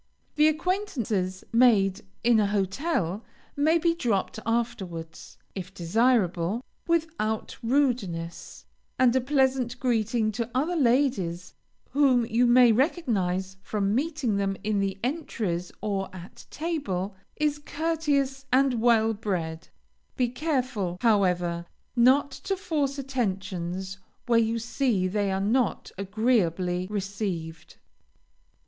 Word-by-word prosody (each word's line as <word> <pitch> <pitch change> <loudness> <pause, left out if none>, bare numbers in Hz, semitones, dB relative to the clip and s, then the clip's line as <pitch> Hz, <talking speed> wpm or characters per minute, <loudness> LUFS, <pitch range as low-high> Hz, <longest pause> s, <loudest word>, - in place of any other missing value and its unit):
The 300 0 +4
acquaintances 290 - -1
made 215 -6 +4 0.2
in 235 -2 +5
a 205 - +3
hotel 200 - -1 0.3
may 310 +4 +3
be 335 0 +2
dropped 225 - -1
afterwards, 195 -9 -3 0.2
if 185 -1 -6
desirable, 200 +1 +1 0.2
without 320 -10 -1
rudeness, 230 -10 -1 0.3
and 255 -1 +4
a 260 - +3
pleasant 260 -2 +1
greeting 225 -3 +1
to 230 +2 -3
other 310 +7 +1
ladies 235 - +1 0.4
whom 265 -4 +4
you 240 +2 +2
may 240 0 +7
recognize 195 - 0
from 200 0 -1
meeting 275 -5 0
them 195 -1 -1
in 210 -1 0
the 195 -1 -1
entries 220 - -2
or 195 -2 -2
at 180 0 -11
table, 210 - -3 0.2
is 300 -1 0
courteous 290 -3 -1
and 260 -2 +3
well 225 -2 +4
bred; 175 -7 -3 0.5
be 250 -2 +2
careful, 250 - -2
however, 180 -6 +2 0.3
not 260 +4 +4
to 390 - -3
force 290 -6 -1
attentions 190 -7 -3 0.3
where 235 -2 +4
you 225 0 +1
see 230 -4 0
they 200 +1 0
are 190 - 0
not 220 +4 0
agreeably 185 -4 +1
received. 190 -6 -4
225 Hz, 115 wpm, -27 LUFS, 190-265 Hz, 0.5 s, may